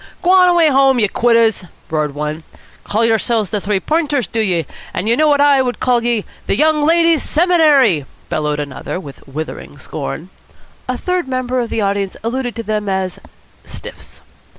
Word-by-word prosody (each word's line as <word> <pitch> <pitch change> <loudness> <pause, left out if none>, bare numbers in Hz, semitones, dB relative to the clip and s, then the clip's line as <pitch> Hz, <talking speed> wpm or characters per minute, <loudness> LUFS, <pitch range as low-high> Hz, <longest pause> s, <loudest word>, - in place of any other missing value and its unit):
"G'wan 365 0 +5
away 345 -3 +4
home, 270 -1 +4
ye 215 -3 +3
quitters!" 230 -1 +2 0.3
roared 150 -2 -1
one. 150 +2 -4 0.4
"Call 220 +3 0
yersilves 225 -3 +1
the 210 - -1
Three 200 0 0
Points, 295 - 0
do 225 - -4
ye? 175 -7 0 0.3
An' - - -1
would 215 - -1
ye - - +4
know 310 +4 +3
what 290 -1 +3
I 285 -2 +5
call 245 -2 0
ye? 235 -3 0 0.2
The - - +1
Young 310 -1 +2
Ladies' 330 -2 +3
Seminary!" 295 - +3 0.2
bellowed 150 -2 -2
another 145 +4 -5
with 145 -6 -12
withering 155 +3 -7
scorn. - - -6 0.6
A 255 - -1
third 360 -1 -2
member 255 -1 -1
of 235 -2 -2
the 225 - -1
audience 200 -1 -1
alluded 245 +1 -3
to 230 - -5
them 210 -1 -2
as 190 -1 -2 0.4
"stiffs." - - -11
230 Hz, 175 wpm, -17 LUFS, 190-290 Hz, 0.6 s, G'wan